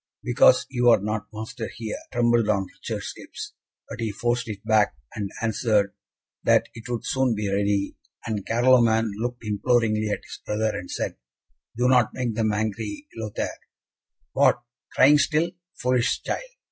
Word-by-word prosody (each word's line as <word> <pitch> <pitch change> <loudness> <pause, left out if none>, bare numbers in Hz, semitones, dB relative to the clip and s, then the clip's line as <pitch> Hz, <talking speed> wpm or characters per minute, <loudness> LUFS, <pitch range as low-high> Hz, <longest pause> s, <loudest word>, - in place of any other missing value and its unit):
"Because - - +5
you 120 -2 +2
are 115 - +6
not 105 +1 -3
master 110 +1 -6
here," 110 -2 -5
trembled 120 -2 +2
on 100 -2 +2
Richard's - - -6
lips, - - -8 0.3
but - - -8
he 115 -2 -1
forced 120 +3 -1
it 105 0 -7
back, 110 - +3 0.2
and 100 -2 -3
answered 110 -3 +1 0.5
that - - +3
it 115 +1 -10
would 120 -2 -3
soon 130 -3 +1
be 105 -1 -2
ready, 100 0 0 0.3
and 105 -3 -2
Carloman 115 -1 +4
looked 120 +1 -4
imploringly 110 0 +1
at 105 - -2
his - - -9
brother, 110 +1 -1
and 90 - -6
said, - - -3 0.6
"Do 125 +1 +2
not 125 -3 +3
make 125 -3 -1
them 110 0 +1
angry, 105 +4 -3
Lothaire." 110 -2 -4 0.7
"What, 120 - +3 0.3
crying 145 +3 +6
still, 160 +3 +2 0.2
foolish 125 0 +1
child?" - - -2
110 Hz, 155 wpm, -25 LUFS, 105-120 Hz, 0.7 s, are